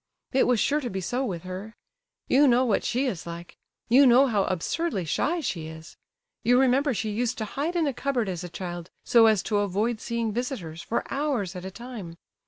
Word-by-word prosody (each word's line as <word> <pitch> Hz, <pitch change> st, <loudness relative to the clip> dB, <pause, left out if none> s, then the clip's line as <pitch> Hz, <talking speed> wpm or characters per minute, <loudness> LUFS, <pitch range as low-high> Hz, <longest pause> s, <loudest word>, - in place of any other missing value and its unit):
It 265 Hz, -, +3 dB
was 250 Hz, -3 st, +3 dB
sure 295 Hz, +6 st, +2 dB
to 250 Hz, -, -3 dB
be 190 Hz, -, -3 dB
so 245 Hz, +8 st, -2 dB
with 180 Hz, -9 st, -4 dB
her. 190 Hz, +4 st, -7 dB, 0.5 s
You 285 Hz, +2 st, +5 dB
know 250 Hz, 0 st, +4 dB
what 220 Hz, -5 st, +1 dB
she 255 Hz, +3 st, 0 dB
is 190 Hz, -10 st, -3 dB
like. 170 Hz, 0 st, -8 dB, 0.3 s
You 260 Hz, +4 st, +6 dB
know 250 Hz, +3 st, +7 dB
how 210 Hz, -7 st, +1 dB
absurdly 190 Hz, -, -1 dB
shy 320 Hz, -, 0 dB
she 165 Hz, -, -3 dB
is. 160 Hz, 0 st, -11 dB, 0.5 s
You 245 Hz, +1 st, +4 dB
remember 270 Hz, +2 st, +3 dB
how -, -, +2 dB
she 215 Hz, +2 st, -2 dB
used 240 Hz, +3 st, -1 dB
to 220 Hz, -, -2 dB
hide 295 Hz, -, -3 dB
in 335 Hz, -2 st, +2 dB
a 280 Hz, -, 0 dB
cupboard 250 Hz, -3 st, -1 dB
as 180 Hz, -2 st, -4 dB
a 180 Hz, -, -6 dB
child, 175 Hz, -1 st, -6 dB, 0.2 s
so 230 Hz, -2 st, +6 dB
as 215 Hz, -4 st, +3 dB
to 210 Hz, -, 0 dB
avoid 205 Hz, +3 st, 0 dB
seeing 230 Hz, -2 st, -2 dB
visitors, 205 Hz, -, -4 dB
for 230 Hz, -, -2 dB
hours 265 Hz, -10 st, -1 dB
at 180 Hz, 0 st, -7 dB
a -, -, -4 dB
time. 215 Hz, -5 st, -8 dB
225 Hz, 215 wpm, -26 LUFS, 185-255 Hz, 0.5 s, know